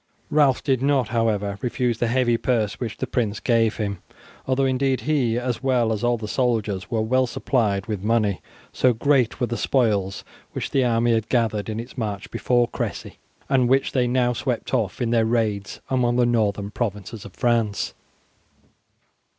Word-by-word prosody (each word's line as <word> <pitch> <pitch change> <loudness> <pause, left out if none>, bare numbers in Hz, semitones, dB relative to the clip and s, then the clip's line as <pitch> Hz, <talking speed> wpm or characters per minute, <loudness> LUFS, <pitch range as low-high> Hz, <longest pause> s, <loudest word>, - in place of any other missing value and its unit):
Ralph 145 -4 +3
did 130 -3 +1
not, 135 -5 +2
however, 105 -4 0
refuse 125 -2 -1
the 120 - +1
heavy 120 0 +2
purse 115 -3 0
which 115 -4 -4
the - - -2
prince 110 -4 -1
gave 115 -2 +2
him, 100 -4 -3 0.5
although 135 +1 +2
indeed 130 0 +1
he, 130 -7 +1
as 125 -1 -2
well 125 -4 +2
as 105 - -4
all 120 0 +2
the 110 -1 -6
soldiers, 105 -6 -1
was 110 -2 0
well 130 +2 +2
supplied 110 -6 0
with 105 -4 -4
money, 105 -2 +1 0.3
so 130 -1 +3
great 130 0 +1
were 125 - +2
the 120 0 -3
spoils 105 -7 0 0.3
which - - -4
the 135 - +2
army 120 -1 +2
had 110 -1 -1
gathered 110 -4 0
in 110 +1 -3
its 120 +2 -8
march 100 -3 -4
before 120 -1 +2
Cressy, - - -5 0.3
and 130 -3 +2
which 135 +1 +2
they 125 -2 +1
now 125 0 +2
swept 125 +1 -3
off 115 -1 0
in 115 - -1
their 115 -1 +3
raids 110 -3 -1
among 120 -2 +2
the 125 0 +3
northern 105 -4 0
provinces 105 -1 -4
of 100 - -12
France. 115 -4 0
120 Hz, 175 wpm, -23 LUFS, 110-125 Hz, 0.5 s, Ralph